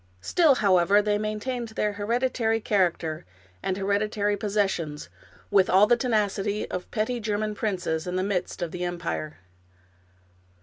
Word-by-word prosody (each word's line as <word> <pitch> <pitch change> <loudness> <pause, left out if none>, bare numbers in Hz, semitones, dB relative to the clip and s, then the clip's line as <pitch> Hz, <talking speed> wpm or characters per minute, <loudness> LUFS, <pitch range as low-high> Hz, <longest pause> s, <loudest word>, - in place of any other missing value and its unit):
Still, 315 - +4
however, 195 -2 +4
they 210 0 +1
maintained 220 +3 -3
their 210 -1 -1
hered 210 +4 -1
itary 225 -4 0
character 170 -6 0 0.4
and 185 - -2
hereditary 205 +1 0
possessions, 195 -7 -2 0.4
with 195 -2 +4
all 195 +3 +6
the 240 +3 +4
tenacity 210 -4 0
of 180 0 -5
petty 235 +2 -1
German 215 -1 -1
princes 180 -6 -2
in 180 - -3
the 185 - 0
midst 190 -3 -2
of 170 - -4
the 180 0 -4
empire. 170 -3 -4
205 Hz, 140 wpm, -26 LUFS, 185-215 Hz, 0.4 s, all